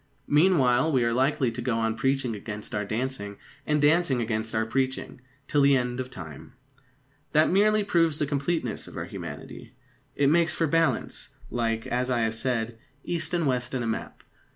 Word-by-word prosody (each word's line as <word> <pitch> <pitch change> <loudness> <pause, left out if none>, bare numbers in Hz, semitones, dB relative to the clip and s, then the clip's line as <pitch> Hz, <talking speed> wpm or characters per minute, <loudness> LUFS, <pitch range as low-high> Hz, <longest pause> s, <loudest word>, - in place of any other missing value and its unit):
Meanwhile, 150 -3 +4
we 130 -4 +3
are 115 0 +1
likely 130 0 +2
to 120 +2 -5
go 120 -1 0
on 110 -1 0
preaching 135 -2 0
against 105 +2 -7
our 105 -1 -1
dancing, 110 -2 -3 0.3
and 150 0 +2
dancing 150 -2 +3
against 110 -1 -2
our 110 0 +1
preaching, 130 +1 -2 0.3
till 145 - +2
the 140 -1 +5
end 125 0 -2
of 130 0 -4
time. 80 - -10 0.8
That 155 +2 +4
merely 210 +2 +4
proves 165 -6 +2
the 150 - 0
completeness 145 +4 -2
of - - -10
our - - -3
humanity. - - -8 0.4
It 140 0 +3
makes 170 0 +3
for 165 - +1
balance, 165 +2 0 0.2
like, 115 -1 -1
as 125 +1 -1
I 120 -2 +1
have 110 -1 +1
said, 115 -1 -2 0.2
east 170 0 -2
and 170 -2 +1
west 125 -1 -1
in 125 - -1
a - - -2
map. 110 - -4
130 Hz, 180 wpm, -27 LUFS, 115-150 Hz, 0.8 s, the